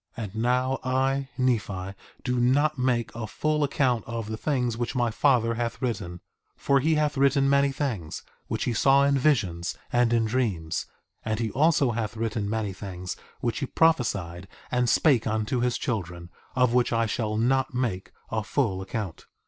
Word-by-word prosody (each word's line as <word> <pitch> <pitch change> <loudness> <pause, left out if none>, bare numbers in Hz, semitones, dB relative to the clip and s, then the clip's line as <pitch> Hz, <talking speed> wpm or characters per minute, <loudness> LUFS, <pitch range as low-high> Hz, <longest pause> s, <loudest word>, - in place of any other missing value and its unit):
1:16 115 - -3
And 100 0 -7
now 125 +3 +1
I, 135 +1 0
Nephi, 105 -7 -1 0.3
do 125 -2 0
not 140 +4 +2
make 125 -3 0
a 115 -2 -5
full 150 +6 0
account 130 -5 +1
of 115 -2 -5
the 110 - -2
things 125 -2 -1
which 120 +3 -3
my 120 -2 +1
father 115 -2 +3
hath 115 0 -3
written, 100 -9 -3 0.4
for 140 0 +2
he 155 +4 +2
hath 150 -1 0
written 135 0 +3
many 140 0 +3
things 120 - -3 0.2
which - - -2
he 120 - 0
saw 135 +4 +4
in 140 0 +3
visions 110 - +1 0.2
and 120 -1 +3
in 115 -1 +3
dreams; 105 -9 -1 0.4
and 110 0 -2
he 115 -2 -1
also 145 -3 +3
hath 110 -1 -3
written 110 -2 -2
many 110 -2 -2
things 90 -2 -6 0.3
which 120 -2 -1
he 140 - -2
prophesied 100 - +1 0.2
and 125 -1 +2
spake 135 -9 +3
unto 110 +3 0
his 120 0 +1
children, 90 -6 -4 0.2
of 125 -2 +3
which 125 -1 +3
I 115 -1 +2
shall 110 -1 -2
not 130 +3 +1
make 115 -7 -2 0.2
a 110 -1 -1
full 105 -6 0
account. 95 -3 -5
120 Hz, 175 wpm, -26 LUFS, 110-135 Hz, 0.4 s, saw